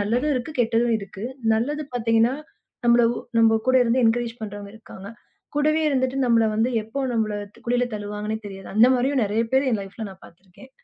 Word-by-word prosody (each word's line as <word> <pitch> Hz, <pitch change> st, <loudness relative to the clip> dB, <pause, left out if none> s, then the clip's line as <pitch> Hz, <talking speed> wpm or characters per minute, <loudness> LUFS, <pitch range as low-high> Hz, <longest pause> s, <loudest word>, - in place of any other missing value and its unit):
நல்லதும் 245 Hz, +9 st, 0 dB
இருக்கு, 255 Hz, +5 st, -3 dB
கெட்டதும் 230 Hz, 0 st, +2 dB
இருக்கு. 200 Hz, +1 st, -8 dB, 0.3 s
நல்லது 290 Hz, +7 st, -1 dB
பாத்தீங்கன்னா 230 Hz, +1 st, +2 dB, 0.5 s
நம்மள 235 Hz, 0 st, +5 dB, 0.3 s
நம்ம 225 Hz, -1 st, +5 dB
கூட 260 Hz, -, +5 dB
இருந்து 245 Hz, +2 st, +2 dB
என்கரேஜ் 230 Hz, 0 st, +1 dB
பண்றவங்க 205 Hz, -1 st, -7 dB
இருக்காங்க. 200 Hz, -3 st, -12 dB, 0.5 s
கூடவே 305 Hz, +2 st, +2 dB
இருந்துட்டு 260 Hz, -1 st, 0 dB
நம்மள 230 Hz, -1 st, +4 dB
வந்து 225 Hz, +3 st, +1 dB
எப்போ 255 Hz, +6 st, -5 dB
நம்மள 215 Hz, -2 st, 0 dB, 0.3 s
குழில 245 Hz, +1 st, +2 dB
தழுவாங்கன்னே 210 Hz, +1 st, -4 dB
தெரியாது. 195 Hz, -1 st, -9 dB
அந்த 225 Hz, +3 st, +7 dB
மாரியும் 260 Hz, +1 st, +1 dB
நெறைய 215 Hz, +3 st, 0 dB
பேர் 265 Hz, 0 st, +3 dB
என் 215 Hz, -3 st, 0 dB
லைஃப்ல 200 Hz, +3 st, -7 dB
நான் 190 Hz, 0 st, -14 dB
பாத்திருக்கேன். 190 Hz, +8 st, -17 dB
230 Hz, 165 wpm, -23 LUFS, 210-250 Hz, 0.5 s, அந்த